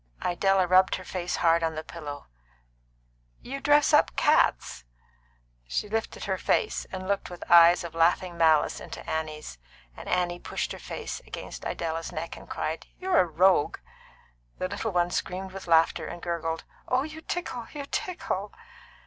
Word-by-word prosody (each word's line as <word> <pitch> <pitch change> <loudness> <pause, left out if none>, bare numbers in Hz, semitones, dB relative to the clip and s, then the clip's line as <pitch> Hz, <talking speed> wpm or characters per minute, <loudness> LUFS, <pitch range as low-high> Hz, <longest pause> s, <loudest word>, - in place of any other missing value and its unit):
Idella 190 +1 +3
rubbed 185 +1 +4
her 185 - -7
face 180 -1 -3
hard 170 0 +3
on 160 -1 -1
the 155 - -4
pillow. 150 -3 -8 1.1
"You 275 +2 -6
dress 295 +1 +4
up 295 - +4
cats." - - +2 0.8
She 135 - -2
lifted 225 +2 -3
her - - -2
face, 435 - 0
and 185 0 -5
looked 200 0 -1
with 175 -1 -8
eyes 170 +1 +8
of 170 -1 -7
laughing 170 +2 +2
malice 160 -2 +3
into - - -9
Annie's, 155 - -4 0.4
and - - -9
Annie 175 -1 0
pushed - - -3
her - - -6
face - - -6
against - - -8
Idella's 165 0 -3
neck 165 0 -5
and - - -13
cried, 160 +1 -3
"You're 370 -1 +2
a - - +5
rogue!" 175 0 +3 0.8
The 185 - -2
little 205 +3 -3
one 175 -1 +1
screamed 190 +2 -3
with 190 -1 -9
laughter 165 -1 +3
and 175 - -7
gurgled: 165 -2 -3 0.2
"Oh, 255 +1 +2
you 315 +1 -8
tickle! 320 -9 -4
You 285 -2 -6
tickle!" 210 - -3
180 Hz, 160 wpm, -27 LUFS, 165-200 Hz, 1.1 s, eyes